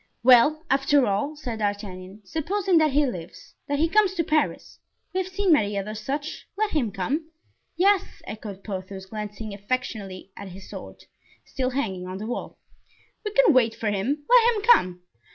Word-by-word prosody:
"Well, 260 +6 +6
after 270 0 +4
all," 210 +10 -1
said 245 -6 -5
D'Artagnan, 200 -1 -4
"supposing 355 - +1
that 310 -1 +4
he 295 +1 +4
lives, 180 -11 -7
that 285 - 0
he 320 +3 +3
comes 395 +1 +3
to 335 - +1
Paris; 310 -1 -1 0.3
we 375 - +1
have 375 0 -6
seen 380 -2 +3
many 205 -8 +2
other 205 +2 -3
such. 275 +8 -5
Let 430 0 0
him 255 -9 0
come." 280 - -2 0.5
"Yes," 390 +1 +2
echoed 205 -3 -8
Porthos, 190 -1 -6
glancing 210 +1 -6
affectionately 200 -3 -4
at 200 - -8
his 190 +1 -11
sword, - - -10 0.4
still 255 -1 -2
hanging 195 -9 -3
on 185 +1 -5
the 210 - -6
wall; 245 - -5 0.7
"we 420 - -2
can 450 -4 +5
wait 230 -3 +3
for 215 -2 -1
him; 265 +10 -1
let 480 -1 +6
him 415 - -3
come." 180 - +4
250 Hz, 170 wpm, -25 LUFS, 200-315 Hz, 0.7 s, Well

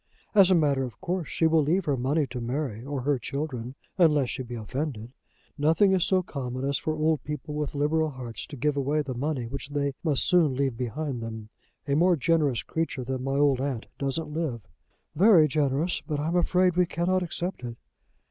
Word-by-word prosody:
As 195 -3 +7
a 185 - +5
matter 145 -5 +2
of 125 -3 -7
course, 180 -3 -2
she 165 - 0
will 160 0 +4
leave 170 +6 +1
her 145 - +1
money 140 +5 +1
to 125 -1 -4
Mary 120 -2 -3
or 140 0 -3
her 140 0 +1
children, 130 -1 -4 0.2
unless 150 -7 +4
she 130 - -4
be 120 -1 -6
offended. 120 +1 -4 0.5
Nothing 165 +7 +4
is 185 -3 +3
so 185 -1 +2
common 130 -4 -4
as 140 - 0
for 155 - -2
old 155 0 +1
people 150 0 -5
with 150 0 -3
liberal 155 +2 +1
hearts 125 -5 -7
to 145 - -8
give 145 +3 0
away 145 +2 0
the 135 -2 -4
money 130 0 -2
which 140 +4 -6
they 140 -1 -1
must 150 -6 +1
soon 165 -7 +4
leave 135 -2 0
behind 130 +2 -3
them. 110 -1 -7 0.4
A 140 - +1
more 175 +4 +4
generous 150 -4 +1
creature 160 -5 -2
than 130 +1 -3
my 135 +1 -1
old 140 -3 +3
aunt 135 -5 -2
doesn't 150 +2 -2
live." 150 -8 -2 0.5
"Very 175 -2 +6
generous; 150 +3 0
but 150 -3 -2
I 150 +2 -1
am 170 - -1
afraid 180 0 +3
we 180 -1 +4
cannot 180 +2 0
accept 175 0 -3
it." 120 -1 -6
145 Hz, 205 wpm, -27 LUFS, 130-160 Hz, 0.5 s, As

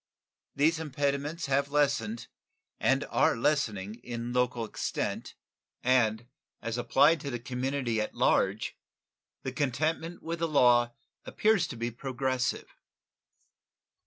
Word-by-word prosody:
These 155 +3 +3
impediments 145 +1 -2
have 140 +1 +1
lessened 120 -6 +1 0.5
and - - +2
are - - +3
lessening 110 -6 0
in 120 0 -4
local 125 -2 +1
extent, - - -3 0.5
and, 120 -3 +2 0.3
as 115 0 -3
applied 150 +6 +4
to 140 - -4
the 120 - -2
community 125 -1 -2
at 110 - -4
large, - - +1 0.7
the 130 - -3
contentment 155 +6 -1
with 170 +1 -3
the 165 - +1
law 120 -5 +4 0.3
appears 215 -5 +2
to - - -7
be 120 +1 -3
progressive. 130 +1 -2
130 Hz, 115 wpm, -29 LUFS, 120-145 Hz, 0.7 s, applied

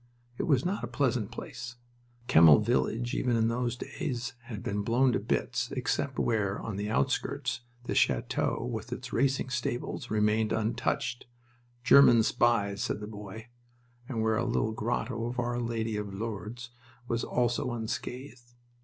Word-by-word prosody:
It - - -1
was 140 -3 +3
not 190 +3 -1
a - - -2
pleasant 125 -7 0
place. 125 +1 -7 0.5
Kemmel 80 - +8
village, 115 - 0
even 125 -2 +1
in 115 0 +2
those 120 +1 -1
days, 120 +1 -4
had 115 -5 -7
been 105 +1 -1
blown 125 +5 +3
to - - +1
bits, 120 +3 -1
except 130 0 -1
where, 100 -4 0
on 110 - -5
the 105 +1 -3
outskirts, 110 - 0 0.2
the - - -3
chateau 115 - +1
with 115 -1 -5
its 125 0 -6
racing 130 +1 +1
stables 120 +1 -3
remained 110 +1 +2
untouched 120 +2 -1 0.6
"German 120 -4 +7
spies!" 105 -4 +2
said - - -1
the 105 - -6
boy 105 +2 -9 0.6
and 115 -4 -1
where 110 -1 +2
a 115 - +1
little 115 -2 0
grotto 115 +1 -2
to 125 - -5
Our 120 0 -1
Lady 115 -2 -2
of 105 -2 -4
Lourdes 115 +3 -5 0.4
was 115 0 -1
also 120 0 0
unscathed. 120 +2 -6
115 Hz, 155 wpm, -29 LUFS, 110-125 Hz, 0.6 s, Kemmel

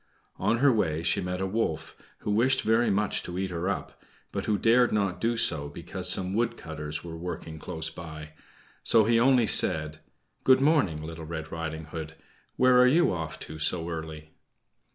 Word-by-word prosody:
On 105 +5 +1
her 140 +3 +4
way 80 -7 0
she 85 - +1
met 90 0 -3
a - - 0
wolf, 95 -5 -2 0.3
who 105 - -2
wished 120 +6 +2
very 115 +1 +2
much 105 0 0
to 90 - -7
eat 95 0 -2
her 90 +2 -2
up; - - -5 0.3
but - - -4
who 105 -2 +1
dared 120 +3 +4
not 100 -4 -1
do 115 +1 0
so 75 -10 +3
because 90 +4 -2
some 95 +1 +2
wood 115 +3 0
cutters 75 -1 -5
were 85 -1 -7
working 80 -2 -6
close 80 +1 -4
by. 80 -2 -9 0.5
So 115 - +4
he 115 +2 +3
only 125 -1 +4
said: 80 -7 +2 0.4
"Good 130 0 +5
morning, 135 - +2
Little 80 0 -7
Red 80 -1 -6
Riding 80 -1 -5
Hood; 80 0 -7 0.4
where 125 0 +5
are 125 - +6
you 160 - +3
off 80 -2 -5
to 80 0 -8
so 85 +2 0
early?" 80 -1 -7
90 Hz, 185 wpm, -27 LUFS, 80-115 Hz, 0.5 s, are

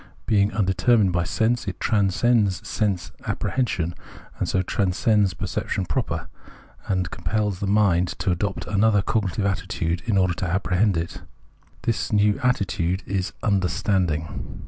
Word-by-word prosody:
Being 100 -2 +3
undetermined 95 +1 +2
by^sense, 110 +7 0
it 95 - -4
transcends 105 0 +2
sense 95 -5 -1
appre - - -3
hension, 95 -10 0 0.5
and - - -1
so 95 - +1
transcends 100 +1 +1
perception 95 - -2
proper, 80 - -2 0.6
and 90 -3 -1
compels 100 +2 -1
the 100 - -2
mind 95 -4 +3
to 95 - 0
adopt 95 +3 -2
another 105 -1 +3
cognitive 100 -2 0
attitude 85 -3 -1
in 105 -4 +2
order 90 -2 +3
to 90 - -3
apprehend 95 +1 +1
it. 85 0 -4 0.6
This 115 -3 -1
new 105 0 +4
atti 125 -5 +2
tude 90 +1 -2
is 95 -2 -2
Understanding. 90 -4 0
95 Hz, 135 wpm, -24 LUFS, 90-105 Hz, 0.6 s, new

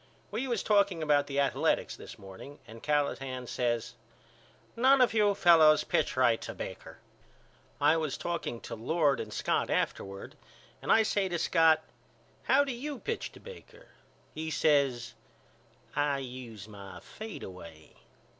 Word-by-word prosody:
We 230 +6 -2
was 235 -5 -1
talking 200 -5 +2
about 145 -2 +3
the 140 0 -2
Athaletics 140 -1 +1
this - - -11
morning 95 +9 -11
and 115 +1 -12
Callahan 135 -3 -1
says 120 -1 -2 0.8
None 265 +3 +5
of 250 -3 +4
you 210 -2 +3
fellows 160 -5 +6
pitch - - 0
right 120 -3 +3
to - - -7
Baker. - - -8 0.8
I 160 - +4
was 155 -3 -2
talking 170 -9 -4
to - - -8
Lord 140 +5 +1
and 110 - -5
Scott - - 0
afterward 100 0 -3 0.5
and - - -1
I 225 - +6
say 200 -3 0
to 175 - -1
Scott 160 -2 +4 0.6
How 280 +2 +5
do 275 - -3
you 275 +4 -5
pitch 460 - -4
to - - -13
Baker? 485 +1 -13 0.4
He 160 +1 -4
says 140 -7 +1 0.8
I 145 -1 +1
use 125 -6 -8
my 100 -2 -10
fadeaway. 90 - -10
150 Hz, 145 wpm, -30 LUFS, 120-200 Hz, 0.8 s, fellows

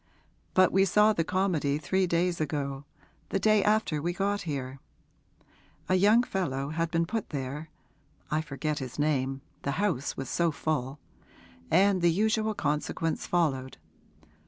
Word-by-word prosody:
But 185 -1 +5
we 195 +1 +4
saw 210 +3 +4
the 170 - 0
comedy 170 -6 0
three 185 +6 0
days 170 0 0
ago 145 -2 -3 0.4
the - - 0
day 215 +1 +3
after 210 -8 +1
we 175 +3 -1
got 200 +2 -1
here. 135 -2 -4 1.1
A - - +1
young 210 +6 +5
fellow 140 - -2
had 165 +2 -1
been 165 0 +1
put 220 +4 -3
there 145 +2 -5 0.6
I 155 +1 +1
forget 150 +1 -3
his 130 -3 -7
name 135 -3 0 0.2
the 140 - -2
house 180 -10 -1
was 135 - -4
so 170 +4 +1
full; 145 -3 -2 0.7
and 190 +1 +4
the 170 - +5
usual 215 +4 +1
consequence 150 +1 -2
followed. 135 -7 0
165 Hz, 145 wpm, -28 LUFS, 140-190 Hz, 1.1 s, But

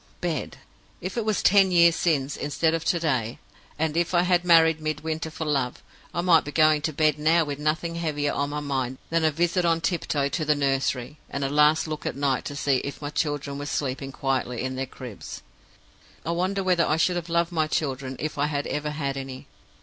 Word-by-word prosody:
"Bed? 165 -6 -3 0.4
If 185 +2 -5
it 230 -3 -1
was 215 -2 0
ten 195 -1 +6
years 170 -2 +5
since, 145 -6 0
instead 160 +2 0
of 165 -1 -1
to 170 - +2
day; 130 -8 -1 0.4
and 160 0 -1
if 170 +1 0
I 175 - +4
had 180 -1 +2
married 165 -2 +5
Midwinter 155 +1 -3
for 160 0 -5
love, 135 -4 -1 0.3
I 175 - -1
might 175 -2 +5
be 145 - -6
going 155 -1 +4
to 155 +2 -1
bed 155 0 +2
now 160 +2 +4
with 145 -2 -5
nothing 155 +3 -1
heavier 150 -3 -1
on 145 0 -1
my 150 0 -3
mind 130 -3 -2
than 165 0 +2
a 160 - +5
visit 175 +4 +1
on 165 -1 +2
tiptoe 160 -5 0
to 155 +3 -2
the 150 0 +2
nursery, 135 0 -1
and 140 - -3
a 135 - 0
last 150 +2 +4
look 155 -1 -4
at - - -3
night 140 -2 0
to 145 - -5
see 140 -2 +1
if 140 +2 -5
my 145 -1 -5
children 145 -2 -2
were 145 - -5
sleeping 135 -1 -3
quietly 130 -3 -2
in 130 0 -3
their 135 0 -3
cribs. 125 -6 -9 0.8
I 165 - -1
wonder 185 +3 0
whether 180 -2 +3
I 155 - +2
should 180 +2 +2
have 175 -1 -4
loved 170 0 +1
my 160 -2 +1
children 135 -4 -2
if 155 -1 -4
I 145 - +2
had 145 -1 -2
ever 150 0 -2
had 140 -2 -3
any? 135 -1 -7
150 Hz, 220 wpm, -25 LUFS, 140-165 Hz, 0.8 s, ten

